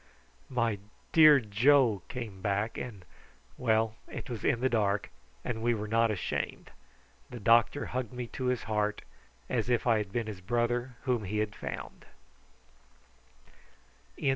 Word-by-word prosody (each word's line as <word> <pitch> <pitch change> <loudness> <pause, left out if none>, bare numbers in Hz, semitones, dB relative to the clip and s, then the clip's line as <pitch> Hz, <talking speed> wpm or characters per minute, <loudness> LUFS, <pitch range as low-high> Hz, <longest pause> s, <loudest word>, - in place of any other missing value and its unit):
"My 115 -5 0 0.3
dear 155 -3 +8
Joe!" 115 0 +3
came 110 -7 -6
back, 100 +3 -1
and 105 -7 -7 0.5
well, 110 -2 +1
it 130 - -7
was 115 - -5
in 130 -5 +2
the 130 - +2
dark, 105 -4 0 0.3
and 115 -3 -3
we 120 0 +2
were 105 0 -4
not 115 +1 +3
ashamed: 105 -4 -3 0.6
the 120 - -7
doctor 115 +5 +4
hugged 125 -3 -3
me 125 -1 -4
to 130 +2 -5
his 125 -1 0
heart, 105 -1 -1 0.4
as - - -1
if 120 -2 +1
I 115 -3 +4
had 100 -2 -4
been 115 +1 -1
his 105 -3 -7
brother 120 +4 -1
whom 125 -6 0
he 105 +3 -2
had 105 -1 -1
found. - - -7
115 Hz, 145 wpm, -30 LUFS, 105-125 Hz, 0.6 s, dear